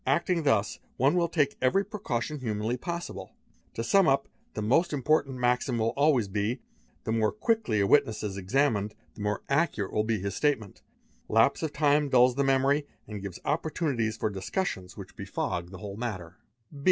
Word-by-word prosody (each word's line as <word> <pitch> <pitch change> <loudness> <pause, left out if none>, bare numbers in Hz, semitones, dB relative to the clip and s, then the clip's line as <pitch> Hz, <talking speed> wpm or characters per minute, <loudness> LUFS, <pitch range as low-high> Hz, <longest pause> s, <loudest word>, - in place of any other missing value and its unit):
Acting 180 -3 +2
thus, 110 -8 +1 0.2
one 135 +6 +3
will 175 -1 +2
take 145 -4 +1
every 195 +11 +3
precaution 150 - -3
humanly 110 -1 -2
possible 125 - -6 0.4
To 115 - -2
sum 195 +8 +4
up, 135 0 +2 0.3
the - - -2
most 160 - +2
important 140 -1 +1
maxim 125 0 +1
will 115 0 0
always 140 -6 +3
be; 105 +5 -1 0.4
"the - - -2
more 110 -1 +2
quickly 220 - 0
a - - +3
witness 110 -2 +3
is 100 -2 -3
examined, 105 +1 0 0.2
the 110 - -10
more 105 0 -2
accurate 140 - 0
will 105 - +2
be 110 0 0
his 100 0 -3
statement." 135 -10 -1 0.5
Lapse 115 +5 +3
of 160 -2 -2
time 145 -1 +2
dulls 125 -1 +5
the 140 +3 0
memory 135 +2 +2 0.2
and 105 -2 -6
gives 95 -3 -6
opportunities 145 -8 -1
for 110 - -1
discussions 95 - -3
which - - -10
befog 85 0 -3
the 95 - -9
whole 100 +2 -7
matter. 95 -8 -5
125 Hz, 175 wpm, -28 LUFS, 105-145 Hz, 0.5 s, dulls